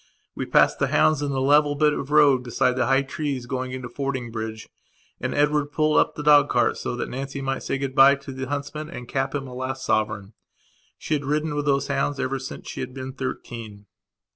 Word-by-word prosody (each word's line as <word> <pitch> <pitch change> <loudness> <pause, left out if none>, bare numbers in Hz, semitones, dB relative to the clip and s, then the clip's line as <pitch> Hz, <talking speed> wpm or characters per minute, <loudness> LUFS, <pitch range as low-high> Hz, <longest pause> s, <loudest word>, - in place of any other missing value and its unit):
We - - -4
passed - - +4
the - - +2
hounds 155 -2 +3
in 145 -1 -1
the 135 - -1
level 145 +2 +4
bit 150 0 +3
of 140 - -4
road 145 -4 +5
beside 125 +1 +1
the 130 - +1
high 135 +1 +3
trees 140 -3 -4
going 130 0 -3
into 130 -1 -5
Fordingbridge 120 -4 -4 0.5
and - - -3
Edward 150 0 +2
pulled 155 0 +2
up - - +1
the 150 - -5
dog 150 -1 +6
cart - - +2
so - - -3
that - - -3
Nancy 135 +2 -5
might 135 0 -2
say - - -2
good 135 -1 -3
bye 135 +1 +7
to 140 0 -10
the 130 0 -5
huntsman 145 +2 -4
and 125 -8 -8
cap 135 +2 -2
him 140 -1 -3
a 125 - -9
last 130 +1 -4
sovereign. 105 -2 -1 0.6
She - - -3
had 145 -1 0
ridden 150 +2 0
with 145 0 -2
those 140 -1 +2
hounds 145 -2 -1
ever 135 +1 -1
since 130 - -8
she - - -6
had 130 - -5
been 130 0 -6
thirteen. 115 -5 -6
135 Hz, 215 wpm, -24 LUFS, 130-145 Hz, 0.6 s, bye